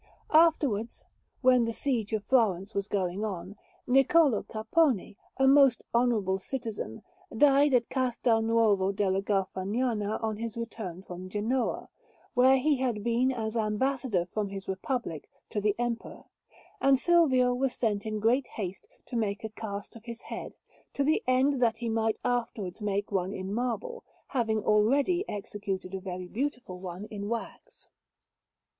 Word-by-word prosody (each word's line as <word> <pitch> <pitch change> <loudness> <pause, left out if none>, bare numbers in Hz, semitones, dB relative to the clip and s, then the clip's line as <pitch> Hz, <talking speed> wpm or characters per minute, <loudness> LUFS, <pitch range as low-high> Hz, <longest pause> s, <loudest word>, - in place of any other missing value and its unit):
Afterwards, 290 -9 +3 0.4
while 255 -2 +5
the 230 0 -1
siege 235 -5 -1
of 215 -2 -1
Florence 210 -6 +2
was 200 0 -2
going 195 -1 -1
on, 190 -2 -5 0.3
Niccolò 270 - +4
Capponi, 220 - +1 0.2
a 270 - +4
most 275 -3 +5
honourable 220 -6 +2
citizen, 225 - -5 0.3
died 280 +1 +5
at 235 -1 +2
Castel 245 -3 +1
Nuovo 220 -4 +3
della 195 -1 0
Garfagnana 205 +3 -1
on 220 -1 -1
his 230 0 -5
return 215 -6 -6
from 180 0 -8
Genoa, 225 +6 -1 0.5
where 260 +2 +5
he 285 +2 +2
had 245 -5 -1
been 240 +2 +2
as 220 -3 -3
Ambassador 225 -2 0
from 200 +3 -3
his 195 -1 -7
Republic 190 - -3 0.2
to 210 - -1
the 210 0 +1
Emperor; 240 -1 -4 0.6
and 270 0 +5
Silvio 260 -6 +4
was 260 +1 0
sent 210 -4 0
in 215 -1 -3
great 240 +5 +2
haste 195 -3 -6 0.2
to 250 - -7
make 210 -3 -1
a 220 - -3
cast 205 -1 -7
of 230 0 -13
his 235 -1 -8
head, - - -7 0.4
to 280 - 0
the 310 +3 +2
end 260 +1 +3
that 230 -2 +3
he 235 0 -3
might 225 0 0
afterwards 230 -6 -2
make 205 0 -2
one 190 0 -1
in 190 +1 -4
marble, 255 - -3 0.3
having 220 -4 0
already 275 - +3
executed 195 -2 -5
a 190 - -3
very 185 -1 -6
beautiful 245 -4 -4
one 180 +2 -6
in 205 -1 -5
wax. 230 -1 -6
225 Hz, 150 wpm, -29 LUFS, 200-255 Hz, 0.6 s, while